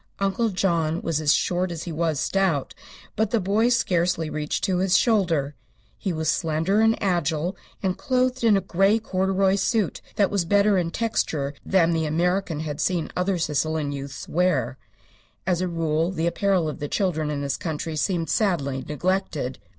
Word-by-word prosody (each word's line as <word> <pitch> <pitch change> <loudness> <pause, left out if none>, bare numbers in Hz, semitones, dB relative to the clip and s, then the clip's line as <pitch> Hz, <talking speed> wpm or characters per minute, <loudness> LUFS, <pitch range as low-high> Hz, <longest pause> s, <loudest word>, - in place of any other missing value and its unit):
Uncle 200 +4 0
John 170 -4 0
was 160 -2 -1
as 150 -2 +3
short 180 +2 +1
as 165 -2 -5
he 175 - -5
was 160 -2 -1
stout, 180 -3 0 0.4
but 220 -1 +1
the 230 - +1
boy 210 +5 +2
scarcely 175 -8 +1
reached 155 +5 -3
to 190 -3 +1
his 190 0 +3
shoulder. 170 - +1 0.4
He 190 - -3
was 160 -1 -2
slender 165 +6 +1
and 225 0 +3
agile, 175 -1 0 0.3
and 185 -1 +1
clothed 255 -1 0
in 220 -3 +5
a - - 0
grey 195 +3 +2
corduroy 190 -2 +1
suit 215 -3 0
that 200 -2 +2
was 200 -3 +1
better 205 +3 +3
in 170 -2 -1
texture 160 -9 -1
than 175 -3 +3
the 160 -1 0
American 170 0 0
had 150 -1 -4
seen 175 -2 0
other 180 +1 0
Sicilian 155 -1 -1
youths 140 -1 -6
wear. 180 +2 0 0.7
As 180 -2 +1
a 185 - 0
rule 165 -1 0
the 170 -3 -2
apparel 185 -1 +1
of 150 - -5
the 145 - -3
children 160 -4 -1
in 145 -1 -2
this 140 -1 -1
country 160 -1 -4
seemed 165 +2 -1
sadly 140 - 0
neglected. 155 -4 -2
175 Hz, 175 wpm, -24 LUFS, 155-195 Hz, 0.7 s, in